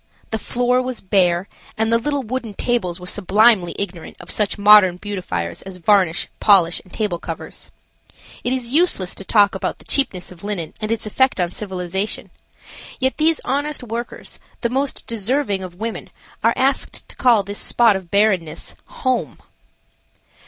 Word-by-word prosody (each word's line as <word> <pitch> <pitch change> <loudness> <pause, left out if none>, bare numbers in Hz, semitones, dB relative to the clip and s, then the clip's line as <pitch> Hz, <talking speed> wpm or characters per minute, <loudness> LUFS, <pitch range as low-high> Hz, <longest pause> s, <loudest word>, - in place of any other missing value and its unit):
The 220 - -1
floor 245 +2 +1
was 255 -1 -4
bare, 185 -1 +2 0.3
and 220 +1 +1
the 230 - +4
little 285 +2 -1
wooden 230 -3 -4
tables 190 -9 -1
were 180 - -9
sublimely 205 0 +3
ignorant 180 -4 -6
of - - -3
such 210 -2 0
modern 205 -3 +7
beautifiers 180 - -4
as 190 -1 -8
varnish, 180 -2 +2
polish 180 -5 +4
and 185 - -20
table 205 -6 -2
covers. 165 -2 -7 0.7
It 245 - 0
is 255 -2 -2
useless 295 - +2
to - - -6
talk 205 0 +4
about 190 - -3
the - - -17
cheapness 190 -12 0
of 180 0 -14
linen 200 -6 -4
and 215 +1 -2
its 230 -1 -1
effect 260 +2 +1
on 175 -1 0
civilization. 190 0 -4 0.7
Yet 260 0 +1
these 315 +1 +2
honest 290 +1 -1
workers, 235 +1 -6 0.2
the 235 - 0
most 270 +3 -1
deserving 230 -1 -1
of 180 -2 -8
women, 225 +4 -5 0.3
are - - +4
asked 270 +1 0
to - - -10
call 235 -6 +4
this 200 +1 -6
spot 230 -4 +4
of 190 -3 -6
bareness–home. 205 - -1
210 Hz, 160 wpm, -20 LUFS, 185-245 Hz, 0.7 s, modern